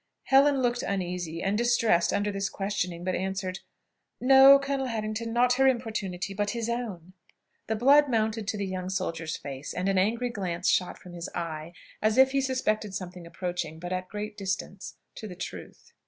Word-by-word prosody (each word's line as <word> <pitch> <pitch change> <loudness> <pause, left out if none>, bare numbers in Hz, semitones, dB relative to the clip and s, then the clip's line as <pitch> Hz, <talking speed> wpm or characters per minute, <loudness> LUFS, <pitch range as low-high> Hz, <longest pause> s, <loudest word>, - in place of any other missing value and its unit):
Helen 275 0 +4
looked 245 0 +1
uneasy 180 -4 -3
and 195 +1 +1
distressed 230 -6 +3
under 205 0 0
this 195 0 -2
questioning, 190 -4 -3
but 185 0 -1
answered, 190 0 -3 0.6
"No, 270 +2 +8
Colonel 275 -1 -2
Harrington; 225 0 -3
not 245 +1 +3
her 270 - +6
importunity, 215 -7 -2
but 205 +3 -2
his 230 0 -2
own." 200 -8 -4 0.5
The 220 - 0
blood 280 +5 +5
mounted 220 -2 0
to 210 - -1
the 200 - -2
young 185 -1 -4
soldier's 165 -4 -3
face, 135 0 -7
and 180 +1 -1
an 195 -1 +2
angry 235 +5 0
glance 180 -5 -2
shot 180 - +1
from 180 - -13
his 170 0 -6
eye, 165 -1 -5 0.3
as 215 +2 +2
if 265 0 +6
he 275 0 +1
suspected 215 -6 -1
something 180 -2 -7
approaching 175 -3 -4
but 175 +2 -5
at 185 0 -4
great 210 0 -5
distance 195 -1 -4 0.2
to 215 - -6
the 180 - -8
truth. - - -9
200 Hz, 180 wpm, -28 LUFS, 180-235 Hz, 0.6 s, No